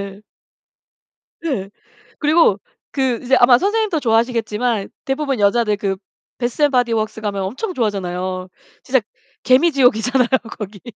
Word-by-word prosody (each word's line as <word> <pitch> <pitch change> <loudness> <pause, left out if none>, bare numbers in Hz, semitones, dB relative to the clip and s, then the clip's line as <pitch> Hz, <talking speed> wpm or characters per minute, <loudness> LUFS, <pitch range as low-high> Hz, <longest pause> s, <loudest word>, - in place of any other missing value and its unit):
예. 200 0 -8 1.2
네. 260 -13 -3 0.5
그리고 300 - +3 0.3
그 260 -4 0
이제 260 +2 +3
아마 245 0 +7
선생님도 410 - 0
좋아하시겠지만 230 -2 0 0.2
대부분 270 -3 -1
여자들 210 +1 +2
그 195 -1 -1 0.4
배스 240 +3 -3
앤 290 - +4
바디웍스 230 -4 0
가면 200 -2 -2
엄청 265 - -4
좋아하잖아요. 185 - -2 0.4
진짜 260 -2 +2 0.4
개미지옥이잖아요. 255 -3 +3 0.3
거기. 200 -2 -8
240 Hz, 310 characters per minute, -19 LUFS, 205-270 Hz, 1.2 s, 아마